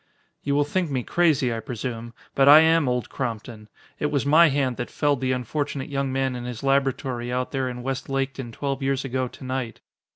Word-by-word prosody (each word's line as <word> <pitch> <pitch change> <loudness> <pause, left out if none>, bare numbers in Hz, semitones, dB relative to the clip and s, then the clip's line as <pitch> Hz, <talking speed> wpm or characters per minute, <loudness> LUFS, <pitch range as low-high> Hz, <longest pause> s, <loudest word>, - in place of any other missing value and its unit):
"You 140 0 -1
will 145 - +4
think 175 +3 -1
me 130 -3 -1
crazy, 150 -7 +2
I 115 - -3
presume. 115 -1 -6 0.2
But 135 0 +5
I 150 +2 +10
am 160 -3 +3
Old 125 -3 -1
Crompton. 115 -3 -5 0.3
It 150 - +1
was 140 -3 -1
my 160 +3 +6
hand 135 -3 0
that 120 - -4
felled 145 -3 0
the 130 0 0
unfortunate 135 +3 -3
young 140 -1 -1
man 135 -1 0
in 120 0 -6
his 125 +1 -6
laboratory 135 -3 0
out 125 0 -2
there 130 -2 -1
in 125 0 -7
West 135 +1 -4
Laketon 135 -2 -2
twelve 140 +3 -3
years 135 0 0
ago 130 0 -1
to 125 - -13
night. 130 -3 -4
135 Hz, 205 wpm, -24 LUFS, 125-140 Hz, 0.3 s, I